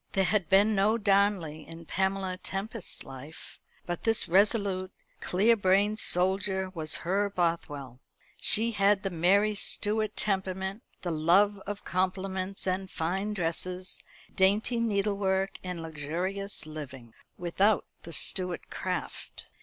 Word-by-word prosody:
There 195 - +3
had 190 -2 +1
been 200 +3 +5
no 210 +3 +3
Darnley 195 -7 +1
in 165 0 -10
Pamela 190 +1 -1
Tempest's 195 +3 -4
life; 135 +4 -11 0.3
but 175 -1 -4
this 225 -1 +2
resolute, 195 0 +2 0.3
clear 210 +6 +3
brained 200 +1 +2
soldier 190 +1 +1
was 155 -3 -1
her 200 +3 +1
Bothwell. 150 -8 -2 0.4
She 230 +2 +3
had 200 -1 +2
the 195 - -2
Mary 195 +5 +3
Stuart 210 +1 0
temperament, 190 +1 -1 0.2
the 175 - -2
love 190 +6 +3
of 205 0 -5
compliments 190 +1 -1
and 190 0 -1
fine 190 +6 -2
dresses, 180 +1 -3 0.3
dainty 205 +5 +2
needlework 200 -3 0
and 180 -3 -5
luxurious 170 +6 -4
living, 135 -7 -9 0.2
without 190 +4 +2 0.2
the 170 - -9
Stuart 180 +3 +2
craft. - - -5
190 Hz, 120 wpm, -29 LUFS, 175-200 Hz, 0.4 s, been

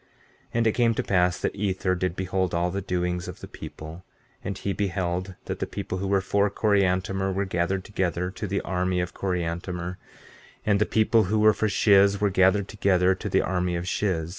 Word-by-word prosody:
15:13 - - -35 0.5
And 115 -1 +2
it 110 - +4
came 115 0 +2
to - - -1
pass 90 -2 +2
that - - -2
Ether 95 -2 0
did 90 -1 -1
behold 95 -1 -1
all 90 +1 +1
the 100 +2 -3
doings 90 -1 -2
of - - -8
the - - -9
people; 80 +3 -9 0.4
and 100 -1 -4
he 100 - -2
beheld 95 -2 -2
that - - -4
the - - -2
people 90 - -4
who 100 - -2
were 100 0 +2
for 100 +2 +1
Coriantumr 95 -2 +1
were 100 +1 -1
gathered 95 +1 -1
together 90 -2 -2
to 105 +2 -5
the 100 +1 -1
army 90 0 -1
of 90 0 -3
Coriantumr; 90 0 -3 0.7
and 105 -2 +3
the 105 - +2
people 110 0 +3
who 105 +4 0
were 110 0 +5
for 110 +1 0
Shiz 100 0 +4
were 105 -1 +1
gathered 95 +1 +3
together 95 -3 +2
to - - -5
the - - +2
army 90 -1 -1
of 85 +1 -3
Shiz. 90 -5 -1
95 Hz, 205 wpm, -26 LUFS, 90-100 Hz, 0.7 s, were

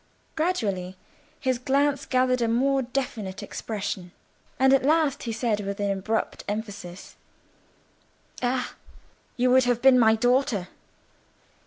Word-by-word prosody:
Gradually 200 - -1 0.4
his 260 -4 0
glance 280 +2 +1
gathered 255 -1 +2
a 230 - +2
more 270 +4 +2
definite 235 -6 -4
expression, 200 -4 -5 0.5
and 265 -1 +5
at 270 - +5
last 295 -1 +2
he 235 - -4
said 225 -2 0
with 200 0 -4
abrupt 200 +2 -1
emphasis— 205 -4 -6 1.3
"Ah! 250 0 -1 0.6
you 250 0 +3
would 260 0 +5
have 245 -1 +1
been 260 0 +6
my 220 -2 +5
daughter!" 245 -5 +1
245 Hz, 120 wpm, -25 LUFS, 205-265 Hz, 1.3 s, been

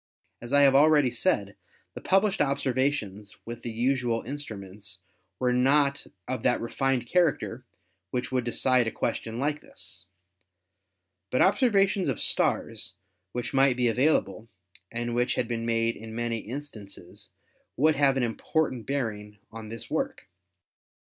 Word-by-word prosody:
As 120 +1 -8
I 145 0 +5
have 135 -1 +6
already 145 -2 +5
said, 120 - 0 0.4
the - - -8
published 195 +1 +2
observations 130 -7 -1
with 120 0 -7
the 120 - -5
usual 120 0 0
instruments 100 -8 -7 0.4
were 125 -1 +1
not 140 +2 +3 0.2
of 130 0 -3
that 125 - +2
refined 130 +1 -1
character 145 -5 0 0.4
which 125 +2 -3
would 130 -1 +1
decide 125 0 +2
a - - -1
question 115 0 -3
like 145 +3 -1
this." 90 -1 -10 1.2
But 125 - +3
observations 195 - +3
of 135 - -1
stars - - 0 0.4
which 120 +3 -4
might 135 -2 +4
be 125 -1 +2
available, 115 -3 +1 0.4
and 120 +1 -3
which 120 +1 +1
had 120 - -1
been 115 -1 -3
made 115 0 +1
in 110 0 -9
many 120 -1 -1
instances, 115 -5 -9 0.5
would 155 +4 +4
have 135 -1 +3
an 130 - +1
important 125 +1 -1
bearing 110 -7 -3
on 110 -1 -8
this 115 +1 -8
work. 270 0 -2
125 Hz, 140 wpm, -27 LUFS, 115-140 Hz, 1.2 s, have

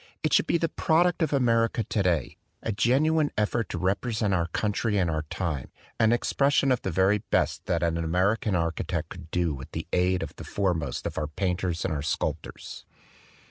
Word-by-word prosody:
It 155 - +1
should - - +4
be - - +3
the 165 - 0
product 175 +2 +2
of 160 - +1
America 115 -4 +2
today, 90 - 0 0.3
a 115 - -1
genuine 145 +8 +2
effort 105 +1 0
to - - -3
represent 105 +2 0
our 85 -2 +1
country 105 +4 -1
and 90 -4 +2
our 80 -1 -2
time, 80 -9 -3 0.3
an 110 -1 +4
expression 140 +3 +2
of 125 - +1
the - - -2
very 95 +4 +3
best - - -1
that 85 -1 0
an 85 -1 +1
American 95 +5 +1
architect 85 0 -2
could 85 -3 -10
do 85 -3 0
with 65 -1 -9
the - - -4
aid 90 +1 +2
of - - -7
the - - -7
foremost 85 -9 -1
of - - -3
our 75 - -2
painters 90 +1 -2
and 80 -6 -1
sculptors. 75 - -4
95 Hz, 180 wpm, -27 LUFS, 85-115 Hz, 0.3 s, should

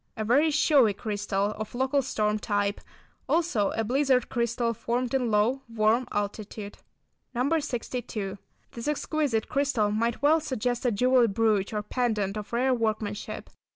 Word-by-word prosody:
A 220 - -2
very 280 +8 +4
showy 285 -8 +4
crystal, 205 -1 -1
of 215 +2 -6
local 265 +3 +2
storm 215 -4 0
type, 205 -1 -1 0.5
also 320 - +2
a 225 - 0
blizzard 255 +1 +2
crystal 235 0 0
formed 240 +3 -2
in 255 -3 +1
low, 220 +5 +2
warm 230 +2 +2
altitude. 205 0 -4 0.6
No. 280 +7 +2
62. 235 -7 -4 0.3
This 235 +2 -7
exquisite 295 -6 0
crystal 265 -7 +1
might 230 +4 -1
well 310 +3 +5
suggest 250 -4 -2
a - - +3
jewelled 240 -1 +3
brooch 215 -3 +2
or 210 -1 -2
pendant 215 -4 -1
of 210 -1 -6
rare 255 +2 +2
workmanship. 215 -3 -3
230 Hz, 145 wpm, -27 LUFS, 210-260 Hz, 0.6 s, well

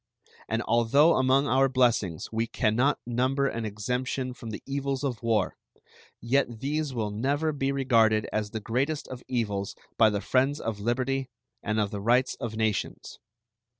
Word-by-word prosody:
And 115 +1 0
although 120 +8 +4
among 130 +2 +3
our 135 0 +3
blessings 120 -10 +1
we 115 +1 -1
can 110 -1 0
not 135 +5 +3
number 130 +3 +1
an 115 -3 -3
exemption 125 +5 -2
from 120 -2 -9
the 110 - -7
evils 140 0 -2
of 125 -6 -2
war, 110 -5 0 0.6
yet 120 -1 0
these 150 +1 -1
will 110 -4 -2
never 140 +9 0
be 135 -2 -1
regarded 115 -6 +3
as 105 -1 -1
the 110 - -4
greatest 135 +8 -1
of 130 -1 -7
evils 105 -5 -2 0.2
by 110 -1 +7
the 105 -1 -1
friends 135 +7 +1
of 110 -2 -4
liberty 130 +4 -1 0.3
and 105 +1 -1
of 105 -1 0
the 100 -2 -4
rights 120 +5 +3
of 115 -2 -4
nations. 110 -2 -2
120 Hz, 165 wpm, -27 LUFS, 110-135 Hz, 0.6 s, by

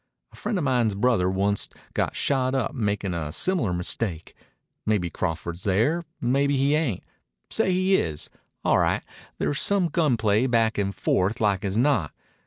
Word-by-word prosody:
A - - -17
friend 210 - -2
of 175 - -1
mine's 120 -6 +1
brother 105 -4 +2
onct 100 +2 0 0.2
got - - -1
shot 130 -1 0
up 130 -4 -1
makin' 100 -6 -1
a 80 -3 -3
similar 175 - +1
mistake. 90 0 -1 0.5
Maybe 100 -6 0
Crawford's 85 0 -4
there. 115 - +1 0.2
Maybe 140 +3 +1
he 140 +2 +2
ain't. 150 - 0 0.5
Say 185 - +1
he 185 +1 +2
is. 75 -3 -3 0.3
All - - +4
right. - - +1 0.3
There's 145 - 0
some 195 -4 +4
gun 150 -6 +1
play 110 +3 +2
back 115 -3 +1
and 100 -1 -1
forth 100 +6 0
like 100 -3 +1
as 100 +1 -2
not. 125 - +1
110 Hz, 165 wpm, -25 LUFS, 95-140 Hz, 0.5 s, All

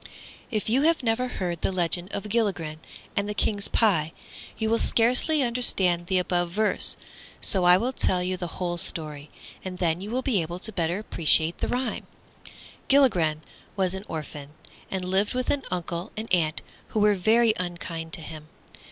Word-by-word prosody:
IF 215 -4 -2
you 245 +5 +3
have 320 -1 +2
never 240 +2 +1
heard 175 -8 -4
the - - +1
legend 175 +1 0
of 200 - -3
Gilligren 190 -9 -1 0.4
and 200 +1 -1
the 210 - -3
King's 205 -1 0
pie 165 -8 +3 0.4
you 220 - -1
will 230 +1 +2
scarcely 250 +6 +4
understand 190 -8 +2
the 190 - +1
above 175 -1 0
verse; 210 +4 0 0.4
so 185 -3 +3
I 180 0 +8
will 245 +6 -1
tell 180 -7 +1
you 185 +1 -1
the 180 -1 -5
whole 175 -1 -2
story, 150 -3 -3 0.3
and 185 -1 -6
then 170 -1 0
you 200 - -6
will 255 +3 -2
be 230 -9 +1
able 170 +2 -5
to 215 +4 -6
better 175 -2 -1
appreciate 165 -5 +2
the - - -1
rhyme. 250 +1 -2 0.8
Gilligren 180 - +3 0.3
was 190 -2 0
an 190 +1 -6
orphan, 150 -2 -7 0.3
and 190 -1 -3
lived 195 +5 0
with 255 0 0
an 285 - 0
uncle 175 +1 -4
and 220 +1 -4
aunt 160 -3 +1 0.2
who 215 - -2
were 210 0 +4
very 220 +4 +3
unkind 170 -2 -5
to 165 - -4
him. 155 -1 -9
185 Hz, 180 wpm, -25 LUFS, 170-220 Hz, 0.8 s, I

